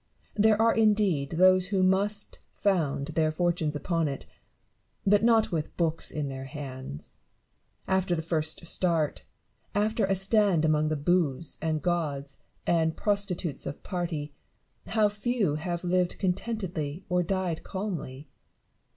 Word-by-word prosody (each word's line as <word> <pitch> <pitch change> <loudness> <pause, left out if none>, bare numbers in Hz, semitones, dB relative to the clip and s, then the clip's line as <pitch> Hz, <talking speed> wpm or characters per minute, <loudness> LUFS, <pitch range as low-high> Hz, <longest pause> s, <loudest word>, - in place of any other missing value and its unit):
There 215 0 +4
are 230 0 +5
indeed 205 -10 +2
those 185 0 +5
who 195 -2 +1
must 200 +2 +1 0.2
found 160 -8 0
their 155 -1 +1
fortunes 165 -2 0
upon 165 +2 0
it: 140 -1 -5 0.8
but 205 +2 +4
not 225 -1 +4
with 160 -3 -3
books 165 -2 0
in 150 -2 -3
their 135 -1 -6
hands. 130 - -7 0.7
After 190 -2 +1
the 160 - -3
first 155 0 -2
start, 165 -3 0 0.5
after 215 +1 +2
a 195 0 +1
stand 190 -4 +3
among 155 0 +2
the 155 - 0
booths 165 -1 0
and 155 -1 -1
gauds 145 -6 -2 0.3
and 160 -1 +2
prostitutes 200 -6 -1
of 140 - -6
party, 170 -6 -3 0.5
how 220 -1 +3
few 205 -4 0
have 170 +3 -3
lived 180 0 +1
contentedly, 180 -5 -2
or 180 -1 +2
died 180 -2 -1
calmly 170 -8 -5
175 Hz, 135 wpm, -28 LUFS, 155-195 Hz, 0.8 s, are